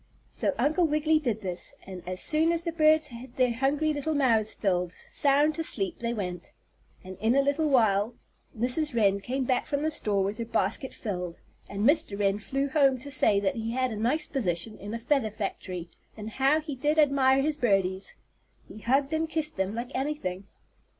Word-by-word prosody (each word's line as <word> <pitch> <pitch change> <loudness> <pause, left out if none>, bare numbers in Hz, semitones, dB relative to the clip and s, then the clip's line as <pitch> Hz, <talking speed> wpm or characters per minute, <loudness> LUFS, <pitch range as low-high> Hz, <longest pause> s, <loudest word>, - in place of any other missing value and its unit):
So - - 0
Uncle 320 +3 +2
Wiggily 310 +1 +2
did 235 -7 -2
this, 185 -3 -4
and 185 -2 -8
as 185 0 -3
soon 320 +2 +3
as 335 0 -1
the 335 - -2
birds 310 -1 +3
had 240 0 -10
their 250 -2 +2
hungry 285 +5 +1
little 300 +2 -2
mouths 230 -6 +2
filled, 180 -3 0
sound 290 +7 +1
to 325 - -2
sleep 195 - -1
they 235 0 -2
went. 180 -6 -5 0.5
And 185 0 -10
in 225 +5 +2
a 275 - +4
little 290 +2 +1
while 220 -4 +3 0.4
Mrs. 255 +5 0
Wren 200 -3 +3
came 260 +6 -2
back 255 0 0
from 285 0 -1
the 315 - 0
store 200 -8 +1
with 200 +4 -3
her 230 - -2
basket 260 +3 -1
filled, 180 -6 -4 0.3
and 200 +1 -2
Mr. 300 -9 +2
Wren 200 0 +1
flew 275 +6 -2
home 275 -3 +3
to 285 +3 -8
say 210 -7 +3
that 195 +2 0
he 225 +1 -3
had 255 0 0
a - - -4
nice 240 +9 0
position 215 - -2
in 205 +3 -6
a - - -4
feather 245 -1 +1
factory, 190 -4 -5 0.3
and 215 +1 -6
how 275 +6 +3
he 305 -2 -6
did 295 +4 0
admire 275 -3 +4
his 300 0 0
birdies! 195 -6 0 0.5
He - - -11
hugged 275 +6 +1
and 320 0 0
kissed 315 -1 -2
them 190 +2 -2
like 240 +3 -5
anything. 205 -10 -3
250 Hz, 195 wpm, -28 LUFS, 205-295 Hz, 0.5 s, a